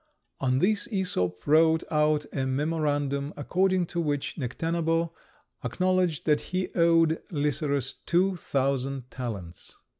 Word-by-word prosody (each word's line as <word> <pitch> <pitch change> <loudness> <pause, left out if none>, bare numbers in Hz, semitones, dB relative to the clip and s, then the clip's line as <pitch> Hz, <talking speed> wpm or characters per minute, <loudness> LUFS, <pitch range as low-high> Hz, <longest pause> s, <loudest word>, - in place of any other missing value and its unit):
On 130 -1 +1
this 210 - +1
Æsop 135 - -1
wrote 160 +2 +4
out 150 -1 +2
a 135 -2 -1
memorandum, 145 0 -1
according 185 +4 +1
to 170 +1 -3
which 145 -3 -2
Necténabo 165 +4 -1 0.5
acknowledged 185 -4 0
that 150 -2 +3
he 185 0 -2
owed 165 -1 +3
Lycerus 145 -3 -1
two 185 +2 +3
thousand 135 -4 -2
talents. 105 -9 -7
155 Hz, 115 wpm, -27 LUFS, 140-170 Hz, 0.5 s, wrote